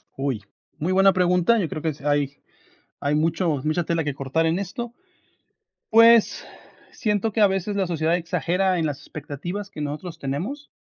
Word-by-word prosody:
Uy, 135 -6 -2 0.3
muy 170 +5 -1
buena 195 +1 +6
pregunta, 180 +4 +3
yo 180 -6 0
creo 155 - -5
que 160 - 0
es 145 -1 -7
hay 145 -1 0 0.6
hay 145 +1 0
mucho 160 -1 +1
mucha 155 +3 0
tela 165 0 0
que 145 -2 -2
cortar 140 +5 0
en 165 +3 +1
esto. 235 +5 -5 1.0
Pues, 230 0 +6 0.5
siento 210 0 -1
que 220 - -2
a 210 - +7
veces 195 +1 -1
la 195 -2 +1
sociedad 165 -1 +1
exagera 180 +2 0
en 160 - +1
las 145 -2 -3
expectativas 155 +8 -6
que 175 - -10
nosotros 150 +3 -4
nos 170 -2 -7
tenemos, 195 - -4
170 Hz, 175 wpm, -24 LUFS, 150-195 Hz, 1.0 s, a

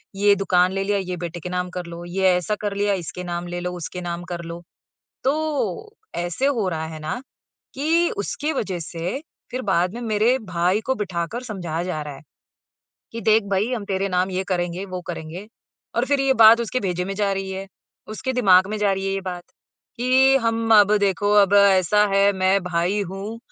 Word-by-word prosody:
ये 205 +1 +4
दुकान 185 -2 +2
ले 195 0 -1
लिया, 205 +1 0
ये 185 -2 -3
बेटे 175 0 -5
के 180 - -6
नाम 180 0 -2
कर 180 -1 -5
लो, 170 0 -8
ये 190 +2 -2
ऐसा 180 +4 -1
कर 205 -1 -2
लिया, 205 0 +2
इसके 180 - -6
नाम 175 0 -4
ले 175 0 -4
लो, 180 0 -3
उसके 180 +1 -6
नाम 175 0 -4
कर 170 -1 -4
लो।" 170 +1 -7 0.6
तो 310 - -1 0.2
ऐसे 175 +8 -2
हो 235 -9 0
रहा 160 -2 -3
है 160 -1 -8
ना, 155 +11 -4 0.5
कि 325 +5 +2
उसके 300 +9 -2
वजह 195 - -2
से 170 +7 -4 0.3
फ़िर 255 +1 -3
बाद 180 +3 +1
में 240 - -6
मेरे 225 +3 +2
भाई 180 +4 +2
को 265 - +1
बिठाकर 190 +2 -3
समझाया 175 -9 -4
जा 180 -4 -3
रहा 150 -1 -7
है। - - -15 0.9
कि, 230 - -5
"देख 220 +1 +4
भाई 200 +5 +1
हम 220 -4 -4
तेरे 195 0 -1
नाम 180 0 0
ये 185 +1 -2
करेंगे, 180 0 -2
वो 185 -1 -5
करेंगे।" 175 +4 -6 0.5
और 235 - +2
फ़िर 280 -1 +2
ये 275 0 +3
बात 225 +2 +8
उसके 235 +2 -2
भेजे 180 -3 -1
में 195 +1 -4
जा 200 0 0
रही 195 0 -3
है। 190 +1 -5 0.5
उसके 260 - -2
दिमाग 190 -7 +5
में 215 +1 -3
जा 205 -1 +2
रही 195 0 -2
है 195 - 0
ये 195 - -2
बात, 180 -2 -5 0.5
कि 260 +2 +4
हम 230 -2 +1
"अब 205 +1 +4
देखो 205 0 +1
अब 200 0 +2
ऐसा 200 0 +5
है 200 +1 +4
मैं 190 0 +2
भाई 180 +3 0
हूँ" 195 +4 -6
195 Hz, 205 wpm, -22 LUFS, 180-220 Hz, 0.9 s, बात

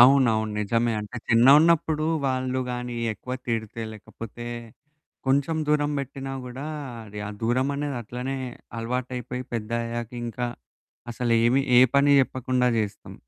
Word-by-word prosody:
అవునవును. 120 -4 +6
నిజమే, 115 +3 +1
అంటే 105 +4 -7
చిన్నగున్నప్పుడు 150 +6 +5 0.2
వాళ్ళు 130 0 0
గాని 125 0 -4 0.2
ఎక్కువ 125 +4 -8
తిడితే, 115 -1 -2
లేకపోతే, 115 +2 -9 0.8
కొంచెం 140 +4 +2
దూరం 145 -1 +2
బెట్టినా 135 0 -5
గూడా, 125 +3 -6 0.4
అది 105 0 -9
ఆ - - -4
దూరం 125 +4 +2
అనేది 145 -2 -2
అట్లనే 125 +4 -4 0.4
అలవాటైపోయి, 125 +1 -3
పెద్దయ్యాక 115 +1 -2 0.2
ఇంకా 120 +1 -2 0.6
అసలు 120 0 +1
ఏమి 125 +3 +4 0.2
ఏ - - +9 0.2
పని 140 +1 +5
జెప్పకుండా 130 -1 +1
జేస్తాం. 105 -2 -4
125 Hz, 120 wpm, -26 LUFS, 115-135 Hz, 0.8 s, ఏ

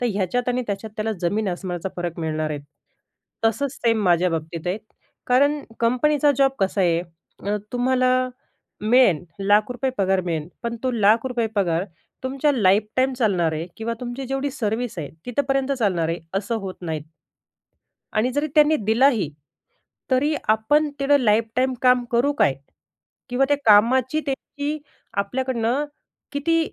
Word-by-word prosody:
तर 245 - +1
ह्याच्यात 205 +6 -1
आणि 250 0 0
त्याच्यात 205 +2 -4
त्याला 220 0 -1
जमीन 200 +4 0
आसमानाचा 180 0 -4
फरक 175 -1 -4
मिळणार 155 -1 -2
आहे. 145 -1 -3 0.8
तसंच 235 +5 +1
सेम 225 -4 +1
माझ्या 175 0 +3
बाबतीत 165 +1 -4
आहे. 190 +4 -1 0.5
कारण 285 +4 +3 0.2
कंपनीचा 290 +5 +3
जॉब 270 -1 +5
कसा 195 +1 +1
आहे 170 -2 +3 0.5
अ, 205 +1 +1 0.2
तुम्हाला 255 0 +2 0.5
मिळेल, 215 - +4 0.2
लाख 205 +3 +3
रुपये 255 +2 -1
पगार 190 -1 +2
मिळेल. 165 -3 -3
पण 235 0 -3
तो 260 - +1
लाख 225 +1 +3
रुपये 240 -3 0
पगार 175 -2 +1 0.4
तुमच्या 275 +3 +1
लाईफटाईम 215 +3 +2
चालणार 190 -10 +1
आहे 160 +2 -3
किंवा 230 +1 -3
तुमची 250 +2 -5
जेवढी 270 +2 -2
सर्व्हिस 235 -3 -2
आहे, 150 -4 -4 0.2
तिथपर्यंत 270 +2 0
चालणार 185 -8 +1
आहे. 165 +1 -1 0.2
असं 205 +4 -1
होत 190 -2 -5
नाहीत. 160 -3 -3 1.1
आणि 230 +4 +1
जरी 290 +3 0
त्यांनी 305 +1 +6
दिला 225 +5 +4
ही 215 - -1 0.8
तरी 280 +4 +3 0.2
आपण 255 +8 +3
तेवढं 285 +1 +4
लाईफटाईम 230 +3 +2
काम 250 -1 +5
करू 245 +5 +3
काय? 135 - +4 0.7
किंवा 250 +2 +2
त्या 290 - +3
कामाची 245 +7 +5
त्यांची 285 +2 -3 0.4
आपल्याकडनं 250 +4 -1 0.5
किती 330 +4 +1
230 Hz, 145 wpm, -23 LUFS, 195-260 Hz, 1.1 s, त्यांनी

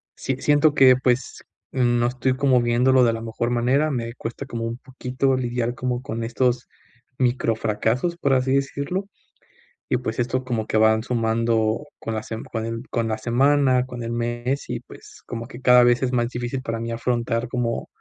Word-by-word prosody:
si 130 - -2
siento 145 +1 +3
que, 130 -3 +7
pues, 130 0 -1 0.3
no 120 -2 +2
estoy 130 +1 0
como 130 -2 +3
viéndolo 125 +2 +4
de 115 - +4
la 115 - -4
mejor 115 +1 -2
manera, 130 +6 +2
me 115 -3 -3
cuesta 120 +3 -6
como 115 -3 -5
un 115 +1 -4
poquito 130 +1 -1
lidiar 120 -1 -2
como 125 -1 -2
con 115 -4 -4
estos 125 +1 0 0.5
microfracasos, 120 +4 0
por 140 -5 +1
así 130 +1 +2
decirlo. 140 +7 -1 0.9
Y - - +2
pues, 110 -2 -4
esto 125 +2 -1
como 115 -4 -2
que - - -1
van 110 0 +4
sumando 115 0 0
con 115 - -4
la 110 - -2
sem 110 0 -6
con 115 -1 -4
el 115 +2 -5
con 115 -1 -1
la 110 0 -2
semana, 130 +2 +3
con 125 -2 -7
el 115 0 -4
mes. 120 +3 -2
Y - - -2
pues, - - -15
como 115 -1 -5
que 120 - -10
cada 125 -1 +6
vez 120 +1 +3
es 130 -1 0
más 120 -1 +1
difícil 120 +2 -4
para 115 -1 -3
mí 115 0 -4
afrontar 115 0 -1
como 120 -2 -2
120 Hz, 185 wpm, -23 LUFS, 115-130 Hz, 0.9 s, que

